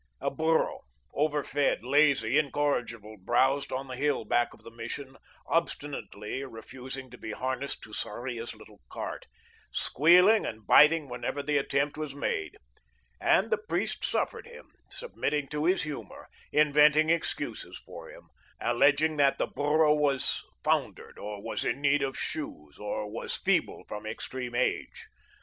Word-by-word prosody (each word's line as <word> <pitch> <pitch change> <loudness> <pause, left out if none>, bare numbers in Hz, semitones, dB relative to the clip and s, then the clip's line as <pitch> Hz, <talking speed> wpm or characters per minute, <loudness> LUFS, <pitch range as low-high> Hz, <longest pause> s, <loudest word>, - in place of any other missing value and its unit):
A - - -1
burro, 160 +3 +1 0.3
over 150 0 +1
fed, 145 -4 0
lazy, 140 -1 +4
incorrigible, 125 -7 -1
browsed 135 +8 +2
on 135 +1 -3
the 130 - -6
hill 140 -2 0
back 120 +3 +2
of - - -17
the 115 - -11
Mission, 125 +4 -6 0.3
obstinately 140 -7 -2
refusing 130 +1 -8
to 125 - -12
be 110 - -5
harnessed 130 +3 -3
to 110 - -11
Sarria's 120 +2 -4
little 110 -1 -16
cart, - - -6 0.4
squealing 180 - +5
and 110 -2 -6
biting 150 +4 +6
whenever 130 +3 -4
the 145 0 +1
attempt 140 +2 0
was 150 -3 -4
made; 400 - -2 0.6
and - - +3
the 460 - +2
priest 445 - -2
suffered - - -1
him, 475 0 -13 0.2
submitting 150 - -2
to 150 +1 -2
his 185 +3 +3
humour, 150 -2 -7 0.2
inventing 150 +1 +5
excuses 170 -1 -2
for - - -10
him, - - -14 0.3
alleging 145 +6 +3
that 140 -1 +4
the - - +1
burro 150 +2 +3
was 145 -3 +1 0.2
foundered, - - -1
or 105 -1 -6
was - - -2
in - - -1
need 145 0 +3
of 135 -1 -2
shoes, 75 - -5
or 105 0 -3
was 110 +2 -4
feeble - - 0
from 105 +1 -6
extreme 120 +2 -5
age. 125 - -1
140 Hz, 145 wpm, -29 LUFS, 120-150 Hz, 0.6 s, biting